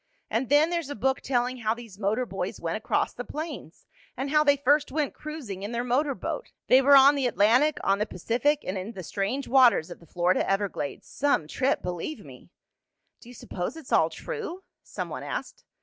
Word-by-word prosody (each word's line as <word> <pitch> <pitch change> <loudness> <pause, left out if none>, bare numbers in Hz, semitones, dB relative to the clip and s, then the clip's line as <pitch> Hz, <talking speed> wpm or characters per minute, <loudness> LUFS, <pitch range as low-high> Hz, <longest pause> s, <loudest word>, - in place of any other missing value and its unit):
And 235 +3 -1
then 295 +4 +4
there's 335 -5 -2
a 285 - -4
book 265 +5 0
telling 250 -1 0
how 220 -2 -1
these 230 -5 -12
motor 220 +5 0
boys - - -5
went - - -2
across - - -1
the - - -6
plains, 300 - -7 0.3
and 270 +2 -3
how 300 0 +5
they 285 -1 +4
first 285 +2 +2
went 295 0 -1
cruising 285 -12 -7
in 205 +4 -5
their 235 +1 -1
motor 265 +3 +1
boat. - - -5 0.2
They 260 - +7
were 280 +1 +6
on 275 +2 +8
the 275 -3 0
Atlantic, 245 +8 +3
on 195 +1 +2
the 210 - 0
Pacific, 250 - 0
and 190 +1 -3
in 200 +5 -6
the 185 - -7
strange 205 - -2
waters 240 -10 +4
of - - -9
the 170 - -18
Florida 175 +3 +1
Everglades. 195 -7 -2
Some 280 - 0
trip, 260 - 0
believe 180 - -5
me!" - - -14 0.7
"Do 240 - -15
you 245 - -12
s'pose 185 - -5
it's 315 -5 -11
all 160 0 +4
true?" 385 - -6 0.2
some - - -6
one - - -6
asked. - - -6
255 Hz, 205 wpm, -27 LUFS, 200-290 Hz, 0.7 s, on